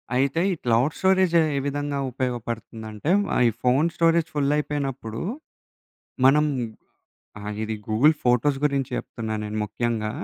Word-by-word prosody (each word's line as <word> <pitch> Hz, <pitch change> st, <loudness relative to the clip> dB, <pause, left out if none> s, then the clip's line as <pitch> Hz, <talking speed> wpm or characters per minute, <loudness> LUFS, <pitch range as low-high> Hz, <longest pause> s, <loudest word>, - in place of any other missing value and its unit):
అయితే 135 Hz, +5 st, +1 dB
ఈ -, -, +1 dB
క్లౌడ్ 120 Hz, +5 st, +2 dB
స్టోరేజే 190 Hz, -3 st, +4 dB, 0.2 s
ఏ -, -, +2 dB
విధంగా 145 Hz, 0 st, -2 dB
ఉపయోగపడుతుందంటే, 115 Hz, -, -4 dB, 0.2 s
ఆ -, -, +2 dB
ఈ -, -, -2 dB
ఫోను 135 Hz, +6 st, +3 dB
స్టోరేజ్ 165 Hz, -1 st, +3 dB
ఫుల్లయిపోయినప్పుడు, 140 Hz, -5 st, -1 dB, 1.1 s
మనం 150 Hz, +3 st, +5 dB, 0.9 s
ఆ! 105 Hz, -, -10 dB, 0.2 s
ఇది 110 Hz, 0 st, -2 dB
గూగుల్ 130 Hz, +9 st, +4 dB
ఫోటోస్ 125 Hz, +3 st, +3 dB
గురించి 140 Hz, -3 st, 0 dB
చెప్తున్నా, 110 Hz, -2 st, -5 dB
నేను 105 Hz, +1 st, -5 dB
ముఖ్యంగా. 110 Hz, 0 st, -2 dB
135 Hz, 125 wpm, -24 LUFS, 115-150 Hz, 1.1 s, మనం